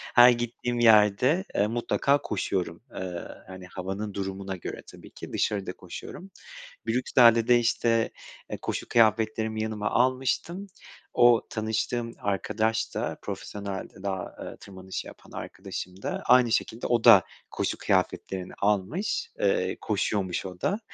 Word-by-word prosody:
Her 120 0 +10
gittiğim 120 0 -1
yerde, 115 - +5
eee, 100 +1 +3
mutlaka 120 +5 +1
koşuyorum, 95 -3 -2
eee, 90 -2 -5 0.2
hani, 95 -1 -9
havanın 95 +3 -5
durumuna 95 0 -4
göre 90 - -6
tabii - - -14
ki. - - -10
Dışarıda 100 -2 -1
koşuyorum. 190 +1 -9 0.6
Brüksel'de 115 -1 +4
de, 125 - +6
eee, - - +5
işte, 115 -1 +1 0.5
koşu - - -3
kıyafetlerimi 110 -1 +2
yanıma 105 -1 -2
almıştım. 130 +10 0 0.5
O 120 -1 +5
tanıştığım 115 +2 -2
arkadaş 110 +3 -1
da - - -2
profesyonelde 100 -2 -6
dağ, 95 -2 -4
eee, - - -7
tırmanışı 95 -1 -7
yapan - - -14
arkadaşım 95 -1 -7
da - - -3
aynı 125 -1 +5
şekilde 115 +1 -1
o 120 -2 +2
da - - +9 0.3
koşu - - -2
kıyafetlerini 95 -1 -1
almış, 105 - 0
eee, - - +1
koşuyormuş 95 -4 -1
o 90 -1 -8
da. 200 +3 0
110 Hz, 130 wpm, -27 LUFS, 95-120 Hz, 0.6 s, Her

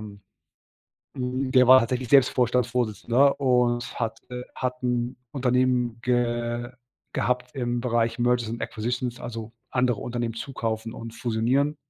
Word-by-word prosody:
ähm 100 -2 -10 1.0
hm, 130 +1 -2
der 130 -2 +5
war 130 +1 +9
tatsächlich 125 +1 -2
selbst 135 -3 +6
Vorstandsvorsitzender 125 +1 +2
und 125 -3 +1
hat, 115 -1 -2
äh 125 0 -5
hat 125 0 -3
'n 125 0 -1 0.2
Unternehmen 125 -3 +1
ge 120 0 -1 0.4
gehabt 125 +3 -1
im 120 -2 -1
Bereich 115 -1 0
Merges 120 -2 +1
and 115 +1 -5
Acquisitions, 120 +2 -3
also, 115 -2 -6 0.2
andere 125 -4 +1
Unternehmen 120 -1 -3
zukaufen 115 -2 -4
und 115 0 -8
fusionieren. 125 +6 0
120 Hz, 130 wpm, -25 LUFS, 115-125 Hz, 1.0 s, war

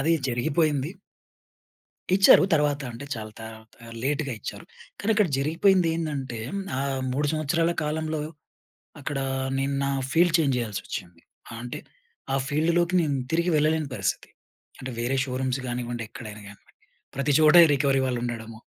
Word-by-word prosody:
అది 160 +4 +2 0.2
జరిగిపోయింది. 140 +3 +1 1.3
ఇచ్చారు 195 0 +7
తర్వాత. 145 -1 +2
అంటే 120 +5 -8
చాలా 110 -1 -7
తరువాత 110 0 -10 0.4
లేట్‌గా 140 -1 -1
ఇచ్చారు. - - -7 0.3
కానీ 220 +2 +1
అక్కడ 210 -3 +4
జరిగిపోయింది 170 +5 +3
ఏందంటే 140 -7 -3
హ్మ్, 200 0 -2
ఆ - - 0 0.3
3 145 +3 0
సంవత్సరాల 165 +2 +1
కాలంలో, 155 0 -2 0.8
అక్కడ 145 0 -4 0.4
నేను 135 +1 0
నా 140 - 0 0.2
ఫీల్డ్ 170 +1 +4
చేంజ్ 140 -5 +2
జేయాల్సొచ్చింది 100 -6 -5 0.3
ఆహ్, 115 - -7
అంటే 125 - -5 0.5
ఆ - - +3
ఫీల్డ్‌లోకి 170 +4 +1
నేను 145 -4 0 0.2
తిరిగి 170 +2 +1
వెళ్లలేని 155 0 +1
పరిస్థితి 100 -2 -2 0.5
అంటే 130 0 -6
వేరే 120 +3 0
షోరూమ్స్ 130 0 -2
గానివ్వండి, 120 -1 -3
ఎక్కడైనా 110 -2 -9
గానివ్వండి. 100 - -16 0.4
ప్రతి 140 +2 +1
చోటా 155 +2 +7
ఈ - - +3
రికవరీ 135 -1 +2
వాళ్ళు 125 -2 -1
ఉండడము. 115 -2 -5
140 Hz, 140 wpm, -26 LUFS, 120-160 Hz, 1.3 s, ఇచ్చారు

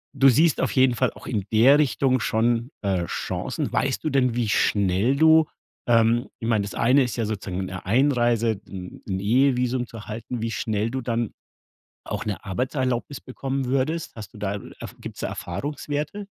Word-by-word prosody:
du 135 0 +6
siehst 155 +6 +3
auf - - 0
jeden 130 -2 +4
Fall 130 +2 +1
auch - - -13
in 105 -5 -1
der 130 +7 +7
Richtung 130 -2 +2
schon, 115 +3 0
äh, 95 -4 0
Chancen. - - -3
Weißt 135 +2 0
du 155 - 0
denn, 125 -4 +2
wie 115 -3 0
schnell 100 +7 +2
du 160 +1 +6 0.4
ähm, 115 +2 +3
ich 115 - -4
meine, 110 -3 +2
das 100 - -6
eine 130 +4 +4
ist 120 -5 -3
ja 115 - 0
sozusagen 95 -3 -3
'ne 95 -1 -7
Einreise 120 -2 +2
'n 90 -2 -9
'n 95 -1 -2
Ehevisum 125 +2 +2
zu - - -13
erhalten, 110 +2 -6
wie 115 0 -2
schnell 105 +2 -1
du 130 - -2
dann 115 -2 -1 0.7
auch - - -4
'ne 105 -1 -4
Arbeitserlaubnis 130 +5 -2
bekommen 135 +1 -3
würdest? 135 +6 -1
Hast 110 +2 -9
du - - -11
da, 100 0 -2
äh, - - -10
Erf - - -8
gibt's - - -8
da - - -2
Erfahrungswerte? 145 - -4
120 Hz, 185 wpm, -24 LUFS, 105-135 Hz, 0.7 s, der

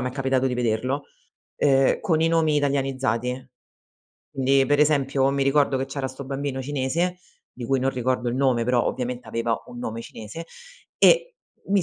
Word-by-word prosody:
m' 125 - -2
è - - -1
capitato 135 -1 0
di 125 - -1
vederlo, 125 +4 -1 0.5
uhm, 135 -2 +3
con 160 -2 +1
i 165 - +3
nomi 160 -2 +2
italianizzati. 130 -3 -1 0.8
Quindi, 135 0 +3
per 145 +1 +2
esempio, 140 -2 +2
mi 140 0 0
ricordo 140 0 +2
che 130 - -1
c'era 135 0 -4
'sto 130 +1 -9
bambino 135 0 -3
cinese, 145 +6 -1 0.3
di 120 -2 -7
cui 135 -1 +1
non 135 - +1
ricordo 125 -1 -1
il - - -3
nome, 130 -3 +2
però 125 0 +2
ovviamente 125 -1 -3
aveva 115 0 -1
un 120 - -10
nome 115 -1 -4
cinese, 115 +8 -9 0.5
e - - +4 0.3
mi 195 -1 +2
135 Hz, 175 wpm, -24 LUFS, 125-145 Hz, 0.8 s, e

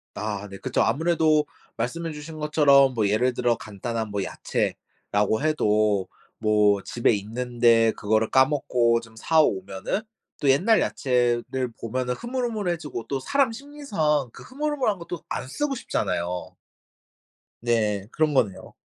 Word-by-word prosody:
아 105 -1 -4
네. 95 - -9
그쵸. - - -1
아무래도 155 -1 +2 0.3
말씀해 160 +8 -3
주신 155 +1 -8
것처럼 140 -3 +5
뭐 110 -3 +1
예를 125 +5 +2
들어 120 -1 +1
간단한 110 +2 -4
뭐 100 -1 -2
야채라고 105 +4 -2
해도 105 -9 +2 0.3
뭐 105 -2 +3
집에 120 -1 +1
있는데 115 +1 +2
그거를 110 +1 0
까먹고 125 -4 +3
좀 115 -1 -15
사 160 +7 +3
오면은 95 - -1 0.4
또 140 - +2
옛날 190 +12 +4
야채를 125 0 0
보면은 125 +2 -2
흐물흐물해지고 205 - -3
또 135 -1 -1
사람 270 - +1
심리상 210 - -1
그 - - -12
흐물흐물한 275 -6 -1
거 170 - -10
또 175 - -6
안 - - -4
쓰고 280 - -2
싶잖아요. 90 - -3 1.1
네 105 -4 0
그런 155 -1 +1
거네요. 105 -8 0
125 Hz, 290 characters per minute, -25 LUFS, 110-155 Hz, 1.1 s, 것처럼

